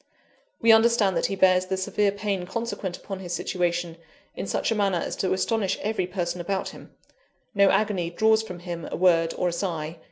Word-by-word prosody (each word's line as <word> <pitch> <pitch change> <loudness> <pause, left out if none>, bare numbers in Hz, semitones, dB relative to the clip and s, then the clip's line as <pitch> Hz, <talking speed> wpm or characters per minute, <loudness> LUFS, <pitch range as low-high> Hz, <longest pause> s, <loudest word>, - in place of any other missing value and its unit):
We 230 - +5
understand 225 -3 +4
that - - +1
he 195 - -3
bears 185 -1 +4
the 190 0 -1
severe 200 +1 +1
pain 200 -3 -3
consequent 195 -3 -4
upon 195 -2 -7
his 175 -2 -6
situation, 175 -1 -2 0.4
in - - -5
such - - -1
a - - +1
manner 200 -3 +1
as - - -3
to 190 - -1
astonish 195 +1 0
every 210 -4 -1
person 180 -1 -3
about 190 +2 -2
him - - -14 0.6
no 200 -1 +5
agony 200 -6 +1
draws 220 +5 +3
from 180 -6 -8
him 175 -2 -6
a - - -3
word 165 -2 +3
or 180 - +1
a - - -4
sigh. 165 -3 -3
190 Hz, 195 wpm, -25 LUFS, 175-205 Hz, 0.6 s, We